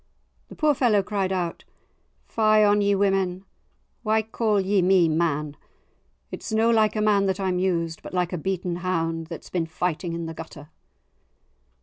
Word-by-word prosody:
The - - -12
poor 305 -1 +2
fellow 230 -7 +2
cried 195 -1 -2
out, 175 -3 -3 0.6
"Fie 215 -1 +3
on 205 0 +4
ye, 200 0 +2
women! 195 -1 0 0.6
why 220 0 +1
call 220 -1 0
ye 195 0 +2
me 180 -1 +4
man? 155 -2 -1 0.8
It's - - -7
no 225 +1 +3
like 220 -2 +3
a 215 - 0
man 205 -2 +3
that 190 0 -1
I'm 185 -2 0
used, 170 -3 -1
but - - -9
like 180 -1 -1
a - - -1
beaten 180 0 -2
hound 165 -3 -2
that's 165 -1 -9
been 170 -3 -1
fighting 170 +1 -3
in 170 0 -4
the 165 - -6
gutter." 155 -2 -10
185 Hz, 165 wpm, -24 LUFS, 170-205 Hz, 0.8 s, on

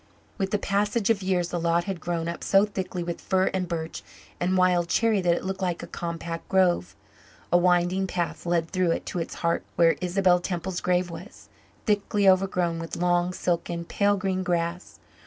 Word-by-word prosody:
With 195 -1 0
the 210 - +1
passage 205 +2 +1
of 205 -3 0
years 180 -2 0
the 175 - -2
lot 170 +1 +1
had 195 -2 -4
grown 170 0 -2
up 170 - -5
so 195 +1 +4
thickly 190 -3 -4
with 170 0 -5
fir 190 -1 +1
and 185 -1 -1
birch 165 -2 -4 0.4
and 185 +1 +1
wild 180 -2 +3
cherry 225 -4 +2
that 175 -1 +3
it - - -5
looked 190 +1 -3
like 175 -3 -1
a - - -4
compact 170 0 -5
grove. 185 - +2 0.6
A - - +8
winding 180 +2 +2
path 175 -1 -3
led 170 -1 0
through 185 -2 +1
it - - -4
to 180 - -3
its 165 - -4
heart 170 - +2
where 165 -1 +4
Isabel 180 0 +3
Temple's 175 0 -3
grave 180 -1 +1
was, 195 +8 -11 0.4
thickly 205 -1 +1
overgrown 185 -3 +2
with 165 0 -5
long, 175 0 +2
silken, 170 -1 -2
pale 205 +3 +1
green 190 -1 -1
grass. 175 -1 -2
180 Hz, 190 wpm, -26 LUFS, 170-190 Hz, 0.6 s, A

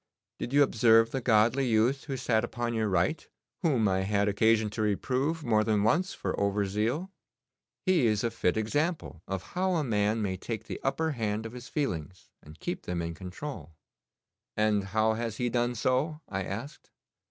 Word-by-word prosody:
Did - - -4
you 145 +1 +6
observe 115 -3 +4
the 135 - -2
godly 120 +3 +3
youth 120 +4 +2
who 135 -2 -3
sat 115 -3 +1
upon 120 0 -3
your 110 -2 0
right, 95 - 0 0.3
whom 135 - +2
I 95 -1 +1
had 100 +1 +1
occasion 110 +1 +3
to 110 - -3
reprove 130 +9 0
more 110 -4 +3
than 105 -2 +1
once 170 - +2
for - - -3
over 100 0 +1
zeal? 115 - -1 0.7
He 175 - +4
is 105 0 +1
a 115 - 0
fit 110 -3 0
example 145 - -1
of 95 -1 -3
how 185 0 +1
a 160 - +1
man 105 -3 +1
may 95 -2 -2
take 110 +2 -5
the - - -6
upper 160 +4 0
hand 110 -4 -2
of 115 - -7
his 125 0 -9
feelings, 95 - -3
and 75 +2 -14
keep 175 +1 -5
them 90 -1 -2
in 85 0 -3
control.' 90 - -8 0.8
'And 105 -2 +2
how 110 +2 +2
has 115 -1 -3
he 125 -1 0
done 120 0 0
so?' 130 +7 0
I 95 -1 -3
asked. 115 +9 -7
110 Hz, 185 wpm, -29 LUFS, 105-135 Hz, 0.8 s, you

